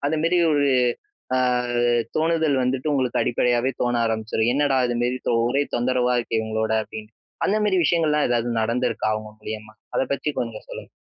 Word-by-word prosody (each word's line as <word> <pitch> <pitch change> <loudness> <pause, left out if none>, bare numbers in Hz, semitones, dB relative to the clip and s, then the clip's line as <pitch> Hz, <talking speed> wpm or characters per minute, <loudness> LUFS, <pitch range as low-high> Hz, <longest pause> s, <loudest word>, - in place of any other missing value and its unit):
அதுமேரி 160 +4 +1
ஒரு, 145 -1 +2 0.7
அ - - +2 0.8
தோணுதல் 160 -3 +2
வந்துட்டு 130 +4 -1
உங்களுக்கு 130 -3 +1
அடிப்படையாவே 120 +2 +1
தோண 120 0 +1
ஆரம்பிச்சுரும். 110 0 0
"என்னடா! 140 -1 +2
இதுமேரி 120 +1 -1 0.3
ஒரே 135 +4 +1
தொந்தரவா 125 0 +1
இருக்கே, 115 -1 -1
இவுங்களோட" 110 0 -2
அப்பிடின்டு. 110 0 -10 0.3
அந்தமேரி 210 -2 +2
விஷயங்கள்லாம் 150 -2 +2
எதாவது 120 0 0
நடந்துருக்கா, 115 0 0
அவுங்க 110 0 -5
மூலியமா? 110 0 -7 0.2
அத - - +2
பத்தி 140 - -2
கொஞ்சம் 115 -2 -5
சொல்லுங்க. - - -9
125 Hz, 140 wpm, -23 LUFS, 115-145 Hz, 0.8 s, ஒரு